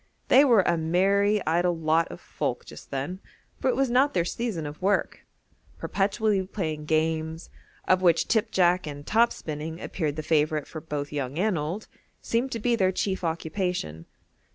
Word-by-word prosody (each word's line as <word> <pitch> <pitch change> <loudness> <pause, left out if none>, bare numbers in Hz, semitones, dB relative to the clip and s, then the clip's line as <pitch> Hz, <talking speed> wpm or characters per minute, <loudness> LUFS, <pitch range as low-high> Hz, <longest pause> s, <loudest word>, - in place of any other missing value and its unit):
They 265 +3 +7
were 235 -8 +5
a 170 -1 +1
merry 195 +5 +2
idle 175 +2 +1
lot 160 +1 +2
of - - -9
folk - - -4
just - - -12
then, 140 +8 -4 0.4
for - - -1
it 255 - +2
was 270 -2 +1
not 265 +4 +3
their 170 -2 +2
season 185 -3 -3
of 145 +3 -8
work: 200 +2 0 0.5
perpetually 205 0 0
playing 155 -7 -4
games 160 +1 -1 0.4
(of 185 0 +4
which 170 -2 +3
tip 220 -2 +1
jack 180 -2 +2
and 145 -1 -7
top 230 +2 +3
spinning 155 +2 -6
appeared 155 -7 -3
the 155 - -4
favourite 155 -1 +1
for 155 - -8
both 145 -2 -4
young 140 0 -3
and 205 +2 +1
old) 165 +7 -4 0.3
seemed 240 +3 -1
to 230 - -3
be 240 +2 +2
their 190 -4 +2
chief 190 0 -2
occupation. 165 - -3
175 Hz, 175 wpm, -26 LUFS, 155-205 Hz, 0.5 s, They